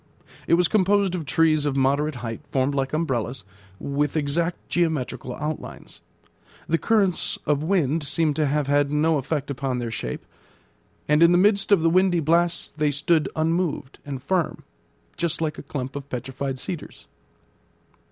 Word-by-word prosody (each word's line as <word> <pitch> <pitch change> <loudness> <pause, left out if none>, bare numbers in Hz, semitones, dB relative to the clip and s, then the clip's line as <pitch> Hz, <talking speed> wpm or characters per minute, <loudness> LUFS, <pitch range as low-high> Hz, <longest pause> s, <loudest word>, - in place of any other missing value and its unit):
It - - +5
was 175 0 +3
composed 200 -1 +2
of 165 -5 -4
trees 155 -1 +3
of 145 -2 -1
moderate 140 +3 +1
height, 115 -1 -5
formed 135 +1 +1
like 135 -1 -1
umbrellas, 135 -6 -2 0.4
with 145 +2 -1
exact 165 +4 -1
geometrical 130 -7 -1
outlines. 150 +1 -6 0.7
The 165 +1 +1
currents 200 -6 +1
of 150 -1 +1
wind 160 -3 +1
seemed 155 0 +1
to 155 -2 +2
have 145 +1 0
had 145 0 +2
no 150 +1 +2
effect 140 +1 -3
upon 135 -1 -2
their 120 -2 -3
shape, - - -5 0.8
and 150 +2 +3
in 170 0 +7
the 175 - +5
midst 200 +2 +3
of 190 -5 +5
the 165 - +4
windy 185 -1 +3
blasts 165 +2 +1
they 150 -1 0
stood 150 +2 +1
unmoved 160 -3 -1
and 135 -2 -6
firm, 175 +2 -1 0.5
just 170 -1 -1
like 155 -2 -2
a - - -12
clump 135 -1 -4
of 140 0 -7
petrified 130 +2 -4
cedars. 160 +4 -7
150 Hz, 160 wpm, -24 LUFS, 140-170 Hz, 0.8 s, in